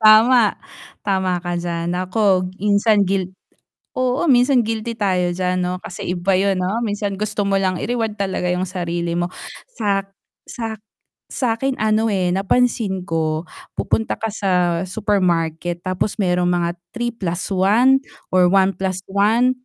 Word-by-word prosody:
Tama, 220 +1 +6 0.5
tama 190 -2 +1
ka 175 -1 -3
d'yan, 170 0 -2
ako 185 0 +1
minsan 205 +1 +3
guilt 185 -1 -1 0.7
oo, 255 +1 +1
minsan 250 0 +5
guilty 225 +1 -3
tayo 180 -4 +1
diyan, 185 0 -1
'no, 180 0 -1
kasi 190 -5 -6
iba 185 +2 0
yun, 195 0 +1
'no, 200 +6 -1
minsan 205 -1 -2
gusto 210 0 -2
mo 195 0 +2
lang 185 -2 0
i-reward 225 -2 -1
talaga 190 -2 -2
'yung 180 +1 0
sarili 170 -2 -3
mo 175 0 -1 0.5
sak 195 -2 0 0.4
sak 225 -2 -5 0.5
sa'kin, 255 +2 -1
ano, 220 0 +1
eh, 185 -4 +1
napansin 195 -1 +1
ko, 160 -2 -1 0.3
pupunta 225 - 0
ka 225 - -3
sa 200 -2 -1 0.4
supermarket, 175 -4 0
tapos 185 +2 -1
may 180 -2 +2
mga 175 -1 +1 0.2
3+1 215 +2 +2 0.3
or 185 -1 +5
1+1, 195 +5 +2
195 Hz, 130 wpm, -20 LUFS, 180-220 Hz, 0.7 s, Tama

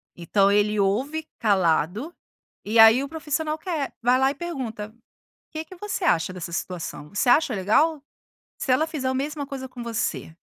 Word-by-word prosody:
Então 195 +3 +2
ele 210 +1 +2
ouve 265 +11 0
calado, 195 - +1 0.5
e 220 +3 0
aí 225 +4 +8
o 280 - -6
profissional 310 0 -2
quer, 315 -4 -3
vai 245 +2 +3
lá 265 +1 +3
e - - -8
pergunta: 240 -11 -5 0.6
"Que 315 0 -5
que 370 - -13
você 405 0 -4
acha 170 - +2
dessa 175 -2 -7
situação? 170 -4 -5
Você 205 +6 -1
acha 275 +1 +4
legal? 275 - +2 0.6
Se 260 - 0
ela 305 +5 +3
fizer 300 -5 -3
a 260 - -1
mesma 285 +2 -3
coisa 265 -1 -6
com 250 -1 -9
você" 225 -8 -3
255 Hz, 170 wpm, -24 LUFS, 205-305 Hz, 0.6 s, aí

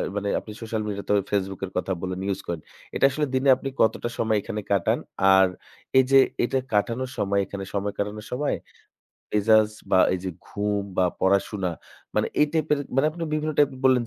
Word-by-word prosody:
মানে 100 0 -1
আপনি 110 - -10
social 110 -1 -3
media 100 -1 -4
তবে 105 -1 +4
Facebook 95 -2 -1
এর 95 - -10
কথা 90 - -1
বলেন 90 0 -3
use - - -3
করেন, 85 -2 -3 0.3
এটা - - +4
আসলে 150 +3 0
দিনে 130 +1 +2
আপনি 135 - -4
কতটা 115 +2 +2
সময় 110 -1 +1
এখানে 105 +1 -4
কাটান? 100 -4 +2 0.4
আর 95 0 +6 0.5
এইযে 130 +1 +5 0.3
এটা 120 - +1 0.2
কাটানোর 115 +5 0
সময় 100 0 +1
এখানে 95 +1 -6
সময় 100 0 -1
কাটানোর 105 +1 -4
সময় 145 +3 0 0.8
মেজাজ 110 0 +4 0.2
বা 95 - +5 0.2
এইযে 95 0 -3 0.2
ঘুম 105 0 -1
বা 95 - +4 0.2
পড়াশোনা, 95 0 +1 0.4
মানে - - +2
এই 150 - +6
type 160 -2 0
এর 150 - +3 0.2
মানে, 135 +3 +4
আপনি 170 +2 -8
বিভিন্ন 155 0 -1
type 145 -1 +4
এর - - -11
বললেন 130 -2 +5
105 Hz, 190 wpm, -25 LUFS, 100-130 Hz, 0.8 s, আর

